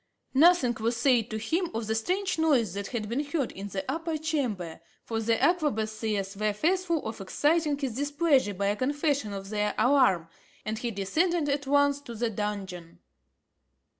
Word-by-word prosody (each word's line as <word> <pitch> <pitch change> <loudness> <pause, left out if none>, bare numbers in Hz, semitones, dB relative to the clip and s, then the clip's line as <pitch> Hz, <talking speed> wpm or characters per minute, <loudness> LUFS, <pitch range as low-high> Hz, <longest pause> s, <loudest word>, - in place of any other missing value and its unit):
Nothing 290 -3 +5
was 230 +2 0
said 240 -3 +3
to 220 - -3
him 325 - -1
of 225 0 -2
the 220 - -1
strange 365 - -1
noise 265 - +2
that 200 0 -4
had 225 -4 -4
been 245 +7 -1
heard 290 -3 -2
in 195 +1 -7
the 195 -1 -4
upper 320 +3 -2
chamber, 250 - -2 0.2
for 225 -1 -3
the 225 0 +1
arquebusiers 220 - 0
were 210 +1 0
fearful 335 - 0
of 220 -2 -5
exciting 300 - +1
his 265 -5 -3
displeasure 285 - +2
by 200 +2 -1
a 205 - +1
confession 285 -1 0
of 195 -1 -6
their 210 0 -1
alarm, 220 -10 +3 0.4
and 220 +1 -3
he 240 - -2
descended 305 - 0
at 280 0 -1
once 285 0 +3
to 240 -5 -9
the 230 +1 -1
dungeon. 195 -5 -5
240 Hz, 170 wpm, -28 LUFS, 210-295 Hz, 0.4 s, Nothing